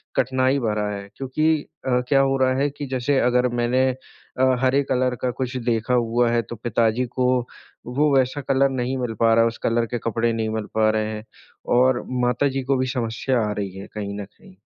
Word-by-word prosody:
कठिनाई 130 +1 +2
भरा 105 -3 -1
है 100 -1 -6
क्योंकि 155 +3 0 0.2
क्या 125 +2 +2
अ, - - +4
हो 135 0 +1
रहा 130 0 +2
है 145 +1 +2
कि 145 +1 -7
जैसे 130 +2 0
अगर 125 0 +3
मैंने 130 +2 +2
अ, 130 0 -2
हरे 135 +2 +3
कलर 125 -1 +1
का 125 - 0
कुछ 130 0 -4
देखा 115 +2 0
हुआ 120 0 +2
है 120 0 +2
तो 120 +2 -8
पिताजी 115 +2 0
को 125 0 +2 0.6
वो 140 +3 +1
वैसा 130 +2 +1
कलर 135 0 +3
नहीं 130 0 -2
मिल 125 -3 -2
पा 115 0 +5
रहा 115 - +5
है, - - +3
उस 115 - -4
कलर 115 0 +1
के 120 - -3
कपड़े 115 +1 0
नहीं 110 -1 -1
मिल 110 -1 -3
पा 110 0 +4
रहे 110 0 0
हैं 105 0 -6 0.5
और 130 0 +3 0.2
माताजी 135 +2 +1
को 135 0 +1
भी 130 - 0
समस्या 120 +1 0
आ - - -1
रही 100 -2 -3
है 100 - -8
कहीं 100 -1 -4
न - - -6
कहीं। 185 - -20
125 Hz, 210 wpm, -23 LUFS, 115-130 Hz, 0.6 s, पा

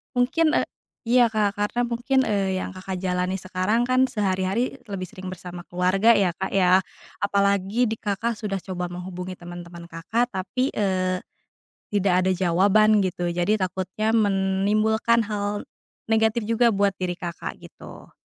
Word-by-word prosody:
Mungkin, 305 +6 +2
e - - +4 0.5
iya, 240 0 +5
Kak, 210 -2 +1
karena 205 +4 0
mungkin, 240 +3 0
eee, 195 -3 0
yang - - -5
Kakak 185 0 -6
jalani 180 0 -1
sekarang 185 +6 0
kan 255 +1 +4
sehari-hari 200 +4 -1
lebih 190 -2 -5
sering 185 +2 -9
bersama 180 -1 -8
keluarga 190 +6 +3
ya, 190 -3 +3
Kak, 190 - -4
ya? 185 -1 +5 0.4
Apalagi 200 +3 +1
di 225 - -2
Kakak 220 +3 -1
sudah 200 -3 -2
coba 180 -2 -4
menghubungi 180 +1 -6
teman-teman 175 -1 -10
Kakak 220 +9 -1
tapi, 200 +8 -1
eee, 185 -2 0 0.7
tidak 200 -2 +1
ada - - +3
jawaban 200 +4 +4
gitu 175 -2 -1
jadi 175 +5 +1
takutnya 190 +2 -2
menimbulkan 215 +2 +2
hal 205 0 -3 0.5
negatif 220 +1 +2
juga 230 +2 +2
buat 200 -3 +2
diri 180 -1 -2
Kakak 175 -1 -6
gitu. - - -13
195 Hz, 145 wpm, -24 LUFS, 185-220 Hz, 0.7 s, iya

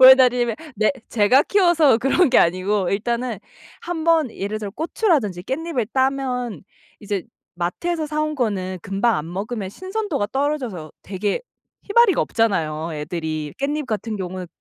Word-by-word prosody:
왜 260 0 +11
다르냐면 245 -3 +3 0.2
네 215 +1 +2 0.2
제가 240 +6 +4
키워서 345 - +4
그런 270 +7 +3
게 255 - +6
아니고 185 +2 +2
일단은 235 +4 -1 0.4
1 340 -2 -4
번 325 -6 +3
예를 205 +2 -3
들어 210 -2 -5
고추라든지 295 - 0
깻잎을 270 -2 -2
따면 260 -4 -1 0.3
이제 200 -2 -3 0.3
마트에서 310 - -2
사 305 0 -2
온 305 0 -1
거는 190 -8 -1
금방 205 +4 +1
안 160 +3 -5
먹으면 205 +1 -4
신선도가 375 - -3
떨어져서 265 - -2
되게 200 - -2 0.4
힘아리가 420 -4 +4
없잖아요, 165 -8 0
애들이. 155 -1 -4
깻잎 290 +2 -1
같은 220 -1 -3
경우에 185 -1 -5
235 Hz, 325 characters per minute, -22 LUFS, 195-295 Hz, 0.4 s, 왜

